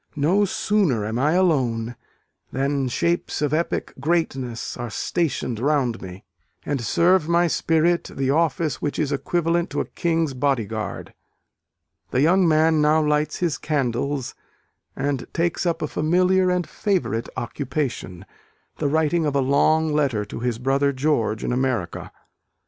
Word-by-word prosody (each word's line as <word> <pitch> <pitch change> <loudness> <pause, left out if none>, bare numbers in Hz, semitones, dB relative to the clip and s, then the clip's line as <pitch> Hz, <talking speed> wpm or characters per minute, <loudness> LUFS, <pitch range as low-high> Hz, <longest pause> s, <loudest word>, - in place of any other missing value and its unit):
No 175 +8 +3
sooner 185 - +1
am 110 +3 -2
I 150 +4 +2
alone, 125 -10 +1 0.6
than 135 0 0
shapes 170 +7 -1
of 150 0 0
epic 165 +2 -1
greatness 135 -6 -1
are 120 0 -5
stationed 130 -3 -2
round 130 -4 0
me, 95 +1 -9 0.4
and 140 -3 -1
serve 170 - +3
my 170 +1 +4
spirit 165 +1 +1
the 135 0 -1
office 160 0 0
which 145 - -2
is 150 -2 0
equivalent 170 +4 0
to - - -3
a - - 0
King's 165 -4 -1
Bodyguard." 115 -6 -2 1.0
The 130 - +1
young 180 +4 +4
man 160 0 +3
now 150 +1 +4
lights 150 0 0
his 170 -4 0
candles, 140 -2 -1 0.6
and 135 -1 -2
takes 170 +1 0
up 165 -1 -1
a - - 0
familiar 180 +5 +2
and 180 -1 0
favourite 170 - -1
occupation; 125 - -4 0.5
the 150 - +1
writing 160 +2 +1
of 145 - -1
a - - +3
long 150 +4 +2
letter 135 -8 +1
to 105 - -7
his 120 -1 -1
brother 135 +3 +1
George 130 -6 0
in - - -1
America. 125 -9 -2
145 Hz, 145 wpm, -23 LUFS, 125-165 Hz, 1.0 s, my